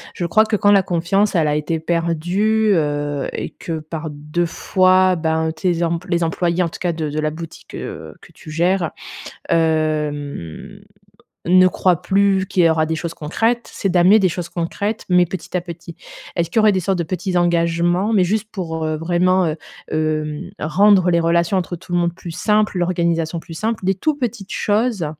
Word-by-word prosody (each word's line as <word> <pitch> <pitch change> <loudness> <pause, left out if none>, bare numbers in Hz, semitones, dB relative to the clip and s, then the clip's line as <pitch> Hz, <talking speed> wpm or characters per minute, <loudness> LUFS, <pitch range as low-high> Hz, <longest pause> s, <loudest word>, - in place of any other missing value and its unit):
Je 175 - -2
crois 215 +6 +4
que 220 - 0
quand 205 0 +3
la 200 -1 +6
confiance, 185 +4 0
elle 160 -3 +3
a 150 - +1
été 150 +2 -1
perdue, 175 +7 +1
heu 145 -3 -1
et - - -5
que 165 -2 -5
par 155 +1 -6
2 150 +4 -2
fois, 185 +2 +3
ben, 160 -1 0
tes 170 +1 -1
emp 170 +1 -1
les 170 -1 +1
employés, 170 +2 0
en 170 - -1
tout - - -10
cas 175 - +1
de 160 -2 -3
de 150 +1 -3
la 155 0 0
boutique, 165 +1 -10
heu, - - -7
que - - -17
tu - - -13
gères, 170 +2 +1 0.6
hem, 150 - -1 0.7
ne 185 +1 +6
croient 180 -1 +1
plus 195 -1 +2
qu'il 185 -2 +2
y - - +6
aura 160 -1 +2
des 160 +1 -2
choses 165 +1 -5
concrètes, 225 +11 -1
c'est 195 - -2
d'amener 185 +3 +5
des 190 -3 +3
choses 175 0 -5
concrètes, 200 +6 -3
mais 180 -1 +5
petit 185 +1 -5
à - - +1
petit. 170 -1 -9 0.4
Est-ce 170 -1 0
qu'il 225 - 0
y - - +6
aurait 215 -1 +5
des 190 - 0
sortes 190 +1 -1
de 170 - -1
petits 185 +2 -3
engagements, 175 +3 +1
mais 195 -4 +4
juste 210 +3 -1
pour, 160 -5 -4
heu, 155 0 -1
vraiment, 180 +3 +2
heu, 155 - -1 0.4
hem, 155 +2 -2
rendre 185 +2 +4
les 170 -1 +3
relations 170 +2 +2
entre 180 -1 -2
tout 175 +1 -12
le 175 - +2
monde 170 0 +1
plus 175 -2 -8
simples, 210 +2 +1
l'organisation 170 -2 0
plus 165 - -11
simple, 220 +5 -2
des 190 - +3
tous 305 +11 0
petites 235 -7 -4
choses, 210 -4 0
175 Hz, 200 wpm, -19 LUFS, 160-190 Hz, 0.7 s, la